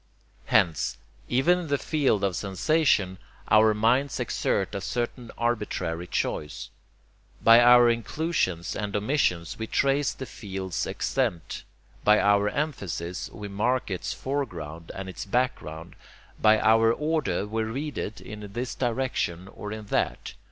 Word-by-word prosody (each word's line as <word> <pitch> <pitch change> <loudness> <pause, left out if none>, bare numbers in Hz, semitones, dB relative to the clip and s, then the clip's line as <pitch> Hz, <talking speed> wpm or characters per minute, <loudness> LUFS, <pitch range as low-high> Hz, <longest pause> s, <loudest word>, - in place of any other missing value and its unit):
Hence, 85 -8 +2 0.3
even 140 +9 +3
in 175 - -5
the 145 -1 +1
field 135 -10 +1
of 95 -3 +1
sensation, 100 - +1 0.3
our 110 0 +6
minds 125 +6 +2
exert 95 0 -1
a 100 - -3
certain 120 +2 -3
arbitrary 95 -8 -2
choice. 75 -2 -3 0.7
By 115 +1 +7
our 120 0 +7
inclusions 115 - -1
and 105 -1 -3
omissions 105 - 0
we 110 - -3
trace 140 +3 +2
the 130 - -7
field's 95 -6 -4
extent; 85 -2 -2 0.4
by 105 0 +5
our 100 0 +3
emphasis 100 - -3
we 105 -2 -7
mark 110 +4 0
its 90 - -3
foreground 85 - -4
and 95 0 -5
its 95 - -6
background; 90 -8 -2 0.5
by 110 0 +6
our 115 +1 +5
order 150 - 0
we 110 +2 -2
read 135 +7 -3
it 105 - -4
in 105 -2 -9
this 120 +1 -3
direction 120 -8 -2
or 105 +1 -8
in 110 0 -6
that. - - -1
110 Hz, 135 wpm, -26 LUFS, 95-130 Hz, 0.7 s, By